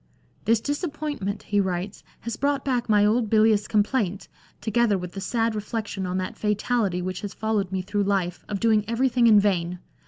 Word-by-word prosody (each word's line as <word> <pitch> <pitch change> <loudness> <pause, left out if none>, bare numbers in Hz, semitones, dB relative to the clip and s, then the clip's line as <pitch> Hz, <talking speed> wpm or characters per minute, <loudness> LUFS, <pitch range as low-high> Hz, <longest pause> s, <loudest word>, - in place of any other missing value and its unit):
" - - -35
This 230 +1 +3
dis 290 +3 -2
appointment," 285 - -3
he 205 - 0
writes, 190 +1 -3
" - - -34
has 235 -1 -4
brought 280 -1 0
back 250 -4 -1
my 205 -1 +5
old 220 +1 +2
bilious 215 -1 +4
complaint, 205 -3 0 0.3
together 220 -1 +2
with 180 -1 -6
the 195 - -7
sad 230 +2 0
reflection 210 -2 -4
on 180 +1 -2
that 185 0 -3
fatality 210 -3 0
which 185 0 -4
has 205 -2 -6
followed 215 -4 -1
me 190 -1 -2
through 205 +2 -1
life, 190 -3 -1
of 205 -2 -2
doing 220 -1 +3
everythmg 240 +1 +2
in 215 -2 +7
vain. 180 -3 0
210 Hz, 195 wpm, -25 LUFS, 195-230 Hz, 0.3 s, in